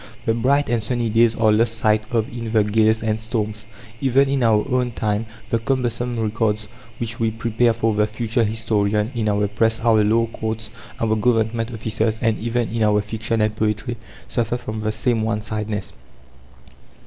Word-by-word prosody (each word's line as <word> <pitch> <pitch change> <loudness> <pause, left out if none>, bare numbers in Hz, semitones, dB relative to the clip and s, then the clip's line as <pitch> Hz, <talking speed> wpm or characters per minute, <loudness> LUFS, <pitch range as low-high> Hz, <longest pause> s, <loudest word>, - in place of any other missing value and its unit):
The 115 - +2
bright 135 +5 +2
and 115 -1 +1
sunny 120 0 0
days 115 0 +4
are 110 -1 +3
lost 115 +2 +2
sight 110 -1 +3
of 115 -2 0
in 115 -2 -4
the 110 -2 +4
gales 110 +1 +2
and 110 0 -1
storms. 110 -1 -3 0.3
Even 135 +1 +3
in 135 -1 0
our 110 -2 +3
own 125 -2 0
time, 105 0 -1 0.2
the 115 - +2
cumbersome 120 -1 -1
records 110 -1 0 0.3
which 115 -1 -4
we 115 -1 +2
prepare 115 +1 +1
for 115 -1 0
the 105 0 +2
future 115 +2 0
historian, 105 0 0
in 110 -3 0
our 105 0 +1
Press, 110 +2 +1
our 110 -2 +4
law 115 +2 +3
courts, 110 -1 -4 0.3
our 110 -1 +1
Government 115 0 +1
offices, 110 0 -1
and 115 -2 +1
even 120 0 -1
in 115 +1 -2
our 105 -1 +4
fiction 110 +2 -2
and 105 0 +1
poetry, 110 +3 -1 0.3
suffer 120 0 -1
from 110 -3 -5
the 110 0 -1
same 115 +1 +1
one 110 -1 -1
sidedness. 105 -2 -3
110 Hz, 180 wpm, -21 LUFS, 110-115 Hz, 0.3 s, days